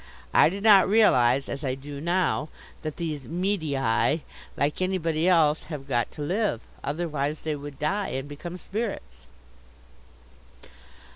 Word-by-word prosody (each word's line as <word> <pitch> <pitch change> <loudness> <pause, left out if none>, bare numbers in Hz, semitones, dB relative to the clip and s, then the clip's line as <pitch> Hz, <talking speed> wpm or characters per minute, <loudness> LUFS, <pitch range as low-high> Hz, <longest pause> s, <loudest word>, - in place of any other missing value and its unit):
I - - +6
did 195 +3 -6
not 200 -4 +7
realize, 135 - +4
as 140 +1 -5
I 130 -2 -1
do 140 +1 -8
now, 170 -2 0 0.3
that 155 -2 -5
these 155 -5 -4
medii, 155 - 0 0.4
like 145 +5 0
anybody 170 -3 0
else, 160 -4 +3
have 145 -4 -7
got 120 -3 0
to 150 - -5
live; 185 - 0 0.2
otherwise 150 -1 -2
they 155 -1 -1
would 145 -1 -8
die 195 +8 -1
and 135 +2 -4
become 170 +5 -7
spirits. 195 - -5
155 Hz, 135 wpm, -26 LUFS, 140-180 Hz, 0.4 s, not